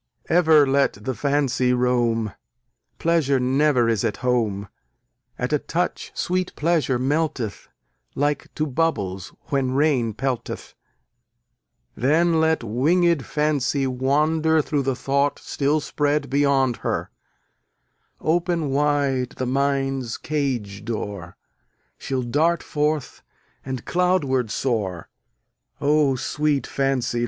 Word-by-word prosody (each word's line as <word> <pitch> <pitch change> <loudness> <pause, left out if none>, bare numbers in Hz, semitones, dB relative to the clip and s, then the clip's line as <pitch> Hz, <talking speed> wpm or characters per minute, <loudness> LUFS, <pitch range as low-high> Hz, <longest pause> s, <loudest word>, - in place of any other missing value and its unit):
Ever 160 -4 +5
let 140 +1 +2
the 105 +6 -4
Fancy 130 -2 +1
roam, 120 -3 +1 0.6
Pleasure 160 -5 +2
never 130 -1 +2
is 115 -2 +1
at 110 -3 -1
home: 110 -5 0 0.7
At 125 +4 -2
a 150 - +3
touch 175 +5 -3
sweet 185 0 -1
Pleasure 155 -5 +1
melteth, 135 -4 -2 0.5
Like 145 0 -1
to 155 - 0
bubbles 115 - -1 0.2
when 135 -2 0
rain 130 -6 +1
pelteth; 130 -1 -4 1.2
Then 160 +6 +2
let 160 0 +2
wingèd 155 - +2
Fancy 145 -2 0
wander 150 +5 +2
Through 145 -1 0
the 135 -1 -1
thought 140 +2 0
still 145 +2 0
spread 145 -2 -1
beyond 135 -3 +2
her: - - -3 1.1
Open 165 -2 0
wide 140 -3 +1
the 130 - -2
mind's 135 -2 0
cage 125 -10 -3
door, 100 -6 -5 0.6
She'll 130 -2 -2
dart 155 +8 +1
forth, 150 -2 -2 0.4
and 130 -3 -5
cloudward 170 -10 +1
soar. 100 -9 -2 0.7
O, 145 -1 +3
sweet 145 +2 0
Fancy! 130 -3 -1
140 Hz, 110 wpm, -23 LUFS, 125-150 Hz, 1.2 s, Ever